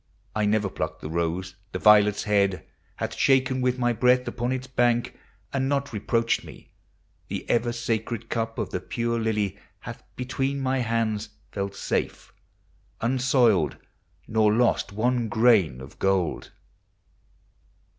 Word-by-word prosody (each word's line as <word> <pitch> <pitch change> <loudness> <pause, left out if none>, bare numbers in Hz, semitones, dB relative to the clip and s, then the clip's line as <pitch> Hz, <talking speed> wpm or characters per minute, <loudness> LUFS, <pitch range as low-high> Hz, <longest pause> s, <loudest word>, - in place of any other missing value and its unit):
I 105 -1 +1
never 105 -1 +2
pluck 75 -4 -4
the 75 - -7
rose; 85 +2 -2 0.2
the - - -1
violet's 105 0 +5
head 100 -2 +1 0.3
Hath - - -4
shaken 130 -1 +2
with 125 0 +1
my 120 -1 +1
breath 125 +2 +3
upon 120 +1 -2
its 130 0 -2
bank 120 -2 +1 0.4
And 135 -1 0
not 140 0 -1
reproacht 115 +2 0
me; - - -13 0.6
the - - -5
ever 120 0 +1
sacred 115 0 -3
cup 115 -1 -2
Of - - -3
the - - -2
pure 115 0 -2
lily 105 -3 -1 0.2
hath - - -8
between 135 +2 -2
my 135 0 0
hands 115 -3 -1 0.2
Felt 100 0 -4
safe, - - -3 0.7
unsoiled, 120 - +2 0.5
nor 110 -1 +3
lost 115 0 +2
one 120 +2 0
grain 105 - +4
of 65 - -12
gold. 95 -4 0
115 Hz, 135 wpm, -25 LUFS, 105-125 Hz, 0.7 s, violet's